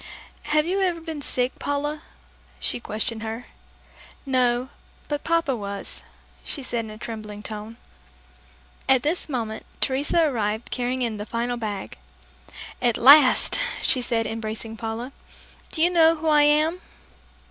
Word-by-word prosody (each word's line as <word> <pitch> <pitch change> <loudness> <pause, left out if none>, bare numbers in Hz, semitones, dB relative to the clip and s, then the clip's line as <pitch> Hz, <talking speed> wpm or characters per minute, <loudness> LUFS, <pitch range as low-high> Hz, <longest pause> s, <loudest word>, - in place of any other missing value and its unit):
"Have 305 0 +2
you 380 +3 0
ever 355 -3 +1
been 320 -2 -6
sick, 250 -2 -1
Paula?" 295 +1 -2 0.6
she 120 - +1
questioned 220 - -3
her. 225 +2 -5 0.8
"No, 250 -1 +1 0.4
but 290 -1 -3
Papa 330 -5 +1
was," 200 -2 -5 0.4
she 280 - -4
said 235 -2 -2
in - - -9
a 215 - -9
trembling 215 -2 -7
tone. 215 +1 -7 1.1
At 260 -2 +5
this 320 +2 -1
moment 225 -5 -3 0.2
Teresa 290 +5 +2
arrived 220 -4 -2
carrying 250 +1 -1
in 225 -3 -2
the 205 - -5
final 240 +2 -1
bag. 210 - -5 0.8
"At 240 -3 +2
last," 280 - +7 0.2
she 255 - +4
said, 230 -2 0
embracing 225 0 -4
Paula. 225 +3 -5 0.6
"Do 320 - +1
you 350 - +4
know 330 -2 +5
who 320 0 -4
I 300 -1 +6
am?" 305 +4 +3
245 Hz, 140 wpm, -24 LUFS, 225-295 Hz, 1.1 s, last